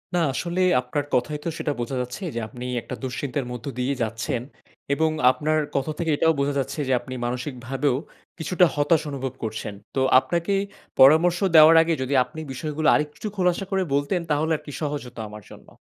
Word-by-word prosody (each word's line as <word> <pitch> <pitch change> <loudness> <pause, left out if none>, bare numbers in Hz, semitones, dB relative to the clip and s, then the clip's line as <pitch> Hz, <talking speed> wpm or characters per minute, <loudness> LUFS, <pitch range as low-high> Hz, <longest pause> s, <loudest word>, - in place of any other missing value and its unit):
না - - +3
আসলেই 180 +5 +1
আপনার 125 +4 -2
কথায় 150 +4 0
তো - - 0
সেটা 150 - -1
বোঝা 120 +3 -3
যাচ্ছে 125 +7 -6
যে, 120 - -1
আপনি 125 +3 -8 0.2
একটা 125 - -7
দুশ্চিন্তার 130 +1 -3
মধ্য 120 -2 -7
দিয়েই 130 +2 -1
যাচ্ছেন। 115 +1 -2 0.5
এবং 160 +2 +2 0.2
আপনার 155 +3 0 0.2
কথা 140 +3 0
থেকে 165 -1 0
এটাও 160 0 +3
বোঝা 140 +1 +1
যাচ্ছে 135 +3 -3
যে - - 0
আপনি 130 - -9
মানসিক 125 +3 -3
ভাবেও 135 0 +1 0.4
কিছুটা 180 +2 +3
হতাশ 150 +2 +3
অনুভব 135 -2 -4
করছেন। 110 -2 -4 0.2
তো 135 - +1 0.2
আপনাকে 170 +7 -1 0.5
পরামর্শ 160 +6 +6 0.2
দেওয়ার 160 +1 +9
আগে 165 0 +1
যদি 130 +2 -2
আপনি 160 - -11
বিষয়গুলো 155 +3 -2
আরেকটু 150 +7 -2
খোলাসা 180 +1 +1
করে 190 -1 +1
বলতেন 145 +6 +1
তাহলে 155 +2 +1
আর - - -17
কি 145 - -7
সহজ 145 -1 -2
হতো 120 -1 -12
আমার 105 0 -10
জন্য। - - -14
145 Hz, 185 wpm, -24 LUFS, 125-160 Hz, 0.5 s, দেওয়ার